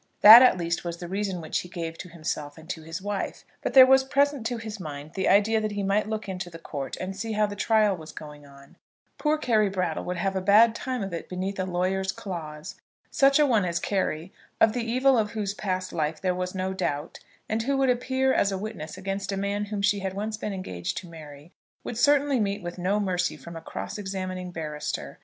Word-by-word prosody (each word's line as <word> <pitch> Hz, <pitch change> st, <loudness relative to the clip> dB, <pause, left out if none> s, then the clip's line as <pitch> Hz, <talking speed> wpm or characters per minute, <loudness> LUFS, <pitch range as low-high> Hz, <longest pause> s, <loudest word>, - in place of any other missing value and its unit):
That 220 Hz, +3 st, +12 dB
at 255 Hz, -7 st, +6 dB
least 170 Hz, -1 st, -2 dB
was 170 Hz, -1 st, -4 dB
the 175 Hz, -, -7 dB
reason 195 Hz, -1 st, -2 dB
which 155 Hz, -, -2 dB
he 180 Hz, -, -8 dB
gave 165 Hz, -2 st, -5 dB
to 180 Hz, -, -8 dB
himself 155 Hz, -3 st, -5 dB
and 160 Hz, 0 st, -13 dB
to 160 Hz, -, -6 dB
his 165 Hz, +4 st, -7 dB
wife. 205 Hz, -1 st, -4 dB, 0.2 s
But -, -, -3 dB
there 260 Hz, -1 st, +11 dB
was 265 Hz, 0 st, +5 dB
present 280 Hz, -2 st, +1 dB
to 240 Hz, 0 st, -3 dB
his 220 Hz, -2 st, -7 dB
mind 150 Hz, -3 st, -7 dB
the 190 Hz, -, 0 dB
idea 215 Hz, +3 st, +4 dB
that 215 Hz, -1 st, -2 dB
he 205 Hz, -1 st, -2 dB
might 200 Hz, +2 st, +1 dB
look 215 Hz, -1 st, -3 dB
into 185 Hz, -2 st, -5 dB
the 165 Hz, -, -10 dB
court 145 Hz, -4 st, -5 dB
and 190 Hz, +1 st, -5 dB
see 220 Hz, +3 st, -4 dB
how 210 Hz, 0 st, +2 dB
the 205 Hz, 0 st, -5 dB
trial 215 Hz, -1 st, +3 dB
was 160 Hz, -2 st, -10 dB
going 150 Hz, -1 st, -10 dB
on. 140 Hz, -1 st, -17 dB, 0.4 s
Poor 305 Hz, 0 st, +2 dB
Carry 220 Hz, -8 st, +2 dB
Brattle 180 Hz, -4 st, -2 dB
would 180 Hz, 0 st, -3 dB
have 195 Hz, +2 st, -1 dB
a 190 Hz, -, 0 dB
bad 215 Hz, +4 st, +6 dB
time 255 Hz, -1 st, -3 dB
of 195 Hz, -2 st, -5 dB
it 170 Hz, -, -5 dB
beneath 190 Hz, +2 st, -4 dB
a 185 Hz, -, 0 dB
lawyer's 190 Hz, +1 st, 0 dB
claws. 155 Hz, -7 st, -7 dB, 0.4 s
Such 275 Hz, 0 st, +4 dB
a 300 Hz, -, +5 dB
one 230 Hz, -7 st, +3 dB
as 170 Hz, -1 st, -1 dB
Carry, 185 Hz, -2 st, -2 dB, 0.3 s
of 220 Hz, -, +5 dB
the 245 Hz, -1 st, -2 dB
evil 255 Hz, +2 st, +3 dB
of 210 Hz, 0 st, -1 dB
whose 205 Hz, -3 st, -2 dB
past 185 Hz, -2 st, -3 dB
life 155 Hz, -1 st, -1 dB
there 185 Hz, -1 st, 0 dB
was 180 Hz, +1 st, -4 dB
no 190 Hz, 0 st, -2 dB
doubt, 155 Hz, -5 st, -3 dB, 0.3 s
and 220 Hz, +1 st, -1 dB
who 275 Hz, +4 st, 0 dB
would 270 Hz, -1 st, +3 dB
appear 260 Hz, +2 st, +1 dB
as 200 Hz, -, +2 dB
a 195 Hz, -, -2 dB
witness 190 Hz, -6 st, -6 dB
against 195 Hz, +1 st, -3 dB
a 195 Hz, -, -2 dB
man 200 Hz, +1 st, -1 dB
whom 205 Hz, -1 st, -4 dB
she 200 Hz, 0 st, +3 dB
had 190 Hz, -1 st, -4 dB
once 215 Hz, +2 st, -3 dB
been 210 Hz, 0 st, -4 dB
engaged 90 Hz, -, -4 dB
to 180 Hz, -, -6 dB
marry, 155 Hz, -1 st, -12 dB, 0.3 s
would 245 Hz, -, -5 dB
certainly 285 Hz, +2 st, +3 dB
meet 200 Hz, -2 st, -1 dB
with 175 Hz, +1 st, -6 dB
no 195 Hz, +4 st, +1 dB
mercy 180 Hz, -3 st, -1 dB
from 170 Hz, -, -10 dB
a 165 Hz, -, -7 dB
cross 185 Hz, -, -6 dB
examining 185 Hz, -2 st, -4 dB
barrister. 155 Hz, -3 st, -5 dB
195 Hz, 235 wpm, -26 LUFS, 175-215 Hz, 0.4 s, That